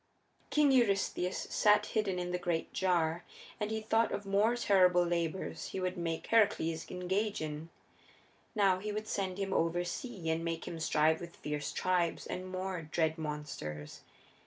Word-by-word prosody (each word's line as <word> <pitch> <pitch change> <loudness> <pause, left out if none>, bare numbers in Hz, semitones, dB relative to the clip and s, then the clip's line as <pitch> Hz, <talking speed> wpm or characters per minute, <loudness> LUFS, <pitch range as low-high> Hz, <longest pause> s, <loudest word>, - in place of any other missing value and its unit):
King 295 -2 +4
Eurystheus 200 -6 +2
sat 210 0 +4
hidden 210 -5 0
in 180 0 -2
the 180 - -1
great 175 -2 -2
jar, 175 -3 +1 0.4
and 210 -1 -1
he 220 0 -1
thought 225 +1 +2
of 205 - -3
more 205 +4 +3
terrible 185 -6 +4
labors 170 +1 -2
he - - -4
would 185 0 -1
make 165 -2 -3
Heracles 200 -8 +2
engage 190 +4 -1
in. 155 +1 -5 0.9
Now 195 -3 +4
he 210 +2 -4
would 215 +1 -4
send 190 -3 -2
him 195 -1 -2
oversea 175 +3 -1
and 160 +1 -1
make 165 -1 -3
him 165 - -5
strive 160 0 +2
with 170 0 -8
fierce 150 -1 -3
tribes 180 -2 0
and 185 +1 -5
more 185 -1 -3
dread 160 +1 0
monsters. 130 - -5
180 Hz, 160 wpm, -33 LUFS, 165-200 Hz, 0.9 s, King